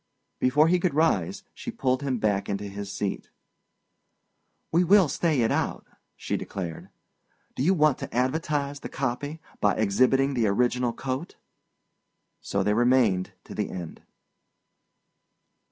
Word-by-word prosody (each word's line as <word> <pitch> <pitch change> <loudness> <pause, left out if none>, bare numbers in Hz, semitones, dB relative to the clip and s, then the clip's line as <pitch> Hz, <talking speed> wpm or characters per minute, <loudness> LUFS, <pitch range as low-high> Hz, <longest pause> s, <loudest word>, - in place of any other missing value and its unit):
Before 150 +5 +4
he 180 +2 +3
could 175 -4 0
rise, 150 - +1
she - - -7
pulled 130 0 0
him 135 -3 -1
back 100 -3 0
into 100 0 -2
his 100 0 -6
seat. 100 -1 -3 1.4
"We 170 +3 +4
will 190 0 +6
stay 155 -2 +1
it 115 - +2
out," - - -1 0.3
she - - -3
declared. 85 -5 -6 0.7
"Do - - -3
you 180 +8 +3
want 155 -4 +3
to - - -6
advertise 140 +2 -1
the - - -7
copy 140 +4 -3 0.2
by 100 -1 +2
exhibiting 130 +6 +2
the 120 -4 +1
original 125 +3 +1
coat?" 130 +7 -5 1.0
So 100 -1 -1
they 105 +2 +2
remained 115 -6 +2
to - - -10
the - - -2
end. 85 -3 -7
125 Hz, 135 wpm, -26 LUFS, 105-145 Hz, 1.4 s, will